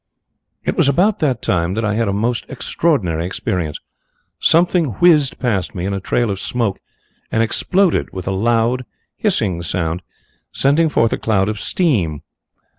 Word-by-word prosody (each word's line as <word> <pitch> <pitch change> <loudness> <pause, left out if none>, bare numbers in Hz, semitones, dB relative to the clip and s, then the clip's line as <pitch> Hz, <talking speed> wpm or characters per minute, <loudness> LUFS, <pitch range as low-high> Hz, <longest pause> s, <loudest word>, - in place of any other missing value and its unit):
"It - - 0
was - - +3
about 195 +9 +2
that 130 -7 0
time 85 +1 0
that 115 0 -1
I 105 - 0
had 115 +2 0
a - - +1
most 115 +4 -1
extraordinary 120 - 0
experience. 90 -3 -3 0.6
Something 165 - +3
whizzed 150 - +4
past 110 -2 -1
me 90 -1 -3
in 100 - -1
a 100 - -2
trail 115 +3 0
of 95 - -4
smoke 115 -3 -1 0.5
and 115 - +2
exploded 185 - +1
with 95 -1 -7
a - - +1
loud, 115 +5 +1 0.3
hissing 105 - 0
sound, 85 0 -2 0.5
sending 155 +4 +2
forth 115 -6 +2
a - - -2
cloud 100 -3 +1
of 105 -1 -3
steam. 100 - 0
115 Hz, 160 wpm, -18 LUFS, 95-140 Hz, 0.6 s, whizzed